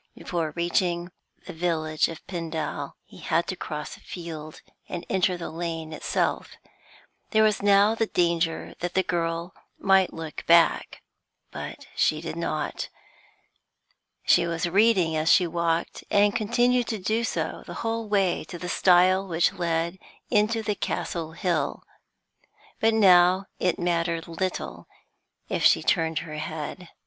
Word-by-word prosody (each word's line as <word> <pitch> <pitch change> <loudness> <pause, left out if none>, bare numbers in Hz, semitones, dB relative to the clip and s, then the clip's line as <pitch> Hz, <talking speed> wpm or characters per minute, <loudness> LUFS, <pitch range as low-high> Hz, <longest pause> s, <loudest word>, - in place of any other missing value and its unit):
Before 165 -3 -3
reaching 175 0 0 0.3
the 185 - -7
village 160 -2 0
of 165 0 -9
Pendal, 165 -3 -4
he - - -15
had - - +1
to - - -3
cross - - -6
a - - -19
field, 160 -3 -8 0.3
and 175 -2 -5
enter 185 -1 +2
the 170 - -6
lane 165 -1 -4
itself. - - -1 0.7
There 220 -1 +4
was 215 -1 +2
now 200 +1 +5
the 225 0 0
danger 170 -3 0
that 175 0 -4
the 190 - +3
girl 170 0 -2 0.2
might 195 -1 +3
look 160 -1 -7
back. 170 0 +3 0.5
But - - -7
she - - +2
did - - -6
not. - - -3 1.4
She 170 -1 +4
was 165 0 -1
reading 190 -3 +3
as 155 +1 +2
she 180 - +6
walked, 170 0 -1
and 205 0 +3
continued 240 +2 +2
to 220 - -2
do 215 +4 0
so 230 - -2
the - - -7
whole 225 0 -2
way 195 -3 +1
to 175 - -8
the 180 - -6
stile 185 +2 +4
which 165 -1 +2
led 170 +1 -1 0.3
into 220 0 +2
the 210 - 0
Castle 165 -4 -3
Hill. 175 -3 -1 1.0
But 225 0 +3
now 185 -2 +6
it 180 - +1
mattered 170 -1 -1
little 185 +3 -4 0.6
if - - -2
she - - +5
turned 160 -2 +1
her 155 -1 -7
head. 160 +3 -6
175 Hz, 145 wpm, -26 LUFS, 165-195 Hz, 1.4 s, she